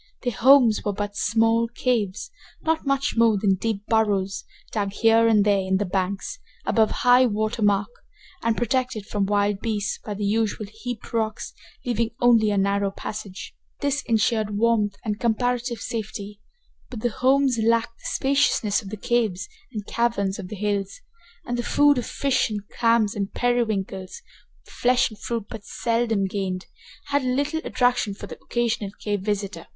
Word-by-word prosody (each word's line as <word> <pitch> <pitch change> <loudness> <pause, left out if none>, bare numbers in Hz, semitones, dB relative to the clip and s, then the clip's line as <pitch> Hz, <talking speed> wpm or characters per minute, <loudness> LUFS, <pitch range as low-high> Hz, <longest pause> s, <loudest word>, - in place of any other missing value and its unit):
Their 245 -2 -1
homes 245 -1 +5
were 205 - -1
but 205 0 -4
small 225 +1 +2
caves, 230 -4 -1 0.3
not 320 -2 0
much 275 0 +1
more 230 -2 +4
than 195 -1 +2
deep 205 +1 -2
burrows, 200 -4 +1 0.3
dug 200 -2 -2
here 225 +1 +4
and 210 -2 +4
there 205 -1 +3
in 190 0 +1
the 205 - -1
banks, 195 - -2 0.3
above 220 -1 +3
high 250 +1 +4
water 215 +1 -1
mark, 205 0 +2 0.5
and 230 -1 0
protected 245 -3 -1
from 205 -2 -1
wild 205 -1 +1
beasts 215 -2 -2
by 210 - -5
the 205 +1 -3
usual 215 +1 0
heaped 220 +3 -8
rocks, 220 -1 -2 0.3
leaving 235 -2 0
only 230 -3 +5
a 205 - 0
narrow 200 0 +1
passage. 200 -1 -7 0.3
This 285 0 0
insured 220 -2 +1
warmth 215 -2 +2
and 210 -1 -2
comparative 245 +1 0
safety, 210 -2 -5 0.5
but 235 -4 -7
the 240 - +1
homes 260 +1 +2
lacked 230 +1 +1
the - - -18
spaciousness 265 -7 +1
of 195 - -9
the 215 - -6
caves 210 -5 0 0.2
and 210 -4 -5
caverns 210 -4 0
of 190 - -6
the 210 - -7
hills, 200 -1 -2 0.5
and 240 0 -2
the - - +2
food 290 +3 +4
of 240 - -5
fish 275 -4 +1
and 210 -1 -5
clams 230 -3 +2
and 200 -1 -4
periwinkles, 215 -6 -1 0.4
with - - -16
flesh 250 -1 +2
and 215 - -12
fruit 230 -3 -3
but 225 -3 -8
seldom 230 -1 0
gained, 190 -1 -3 0.4
had 285 0 +2
little 285 +5 0
attraction 245 -5 +1
for - - -8
the - - -10
occasional 230 -4 -1
cave 205 -2 -2
visitor. 200 -4 -3
220 Hz, 165 wpm, -24 LUFS, 205-240 Hz, 0.5 s, homes